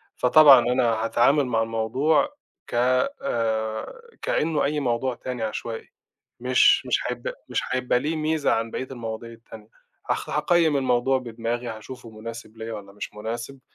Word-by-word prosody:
فطبعًا 140 0 +8
أنا 125 +1 +1 0.2
هاتعامل 135 +5 +3
مع 115 -2 0
الموضوع 125 - +1 0.3
ك - - -11
آآ، 120 - -1 0.2
كأنه 155 -1 0
أي 150 +1 0
موضوع 125 -1 -1
تاني 125 -3 -5
عشوائي، 110 +1 -5 0.5
مش 130 - +4
مش - - +1
هيبقى - - -4 0.2
مش - - 0
هيبقى 125 -1 +1
ليه 155 +4 -2
ميزة 155 -1 0
عن 115 0 0
بقية 130 - -4
المواضيع 115 -2 -6
التانية. 110 -1 -13 0.4
هخ - - -2
هاقيِّم 155 -1 +2
الموضوع 130 0 +2
بدماغي، 120 0 -4
هاشوفه 115 +2 -8
مناسب 115 0 -9
ليَّا 115 0 -6
والّا 100 -1 -8
مش 105 - -7
مناسب، 115 +5 -6
120 Hz, 145 wpm, -24 LUFS, 115-140 Hz, 0.5 s, فطبعًا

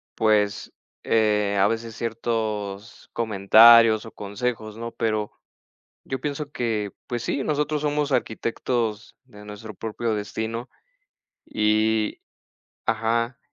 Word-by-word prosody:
pues, 105 -2 +1 0.3
eh, 105 -2 +2
a 100 - +5
veces 115 0 -3
ciertos 110 -2 -4
comentarios 110 +1 +6
o 115 - -9
consejos, 110 +1 -4
¿no?, 115 +1 -5
pero 110 -2 -1 0.7
yo 130 -1 -4
pienso 145 +1 -4
que, 110 -7 -2 0.2
pues 120 -1 -3
sí, 140 - -1
nosotros 150 0 -1
somos 150 -1 0
arquitectos 115 -2 -2
de 105 -5 -15
nuestro 105 +1 -9
propio 115 +1 -3
destino. 110 +3 -4 0.8
Y 110 0 +1 0.7
Ajá. 115 +2 0
110 Hz, 105 wpm, -24 LUFS, 105-120 Hz, 0.8 s, comentarios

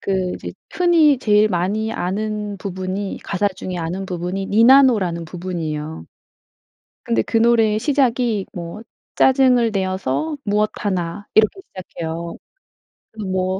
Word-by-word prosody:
그 190 -2 -1
이제 - - -7 0.2
흔히 330 -6 +4
제일 210 -2 +3
많이 210 +5 -1
아는 210 +2 -3
부분이 190 +1 -4
가사 200 +1 0
중에 185 -1 -7
아는 175 +4 -3
부분이 180 +2 -3
니나노라는 225 -7 +4
부분이에요. 160 - -5 1.0
근데 115 -1 +1
그 225 - -2
노래의 225 -2 +3
시작이 245 -6 +1
뭐 175 +4 -7 0.3
"짜증을 255 -3 +4
내어서 190 - -2
무엇하나." 205 -3 -1
이렇게 220 - +3
시작해요. 170 -2 -6 1.0
뭐 185 0 -1
200 Hz, 270 characters per minute, -20 LUFS, 180-225 Hz, 1.0 s, 흔히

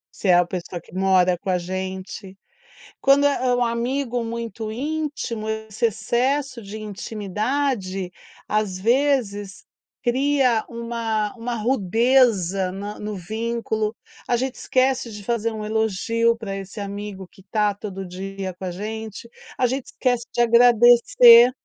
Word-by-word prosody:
Se 200 - -4
é 180 - +6
a 175 0 +4
pessoa 175 -1 -5
que 165 - -19
mora 185 -2 +3
com 190 - -6
a 180 - +2
gente. 190 +2 -6 0.6
Quando 275 +1 +5
é, 275 -3 +1
eh, 245 - +3
um 245 - +2
amigo 240 +1 -1
muito 230 -1 -5
íntimo, 280 -5 -3
esse 220 +1 -1
excesso 245 +4 -1
de 205 +1 -8
intimidade, 210 -1 -3 0.4
às 210 -3 0
vezes, 225 -4 0 0.4
cria 260 -2 +2
uma 230 -3 -2
uma 235 +1 -3
rudeza 220 -4 +2
na 200 +2 -6
no 210 0 -4
vínculo, 220 +2 -2 0.3
A 240 - +2
gente 260 +1 -2
esquece 255 -2 +1
de 210 -1 -9
fazer 230 0 -1
um 215 -1 -5
elogio 220 +2 +1
pra 200 -4 -5
esse 195 +2 -7
amigo 200 -1 -6
que 190 - -19
está 210 +1 0
todo 195 -1 -7
dia 190 +1 -6
com 185 +2 -8
a 180 - -3
gente. 220 +3 -6 0.3
A 255 - +2
gente 260 +1 -2
esquece 245 -2 0
de - - -2
agradecer, 240 0 +7
220 Hz, 140 wpm, -23 LUFS, 195-240 Hz, 0.6 s, agradecer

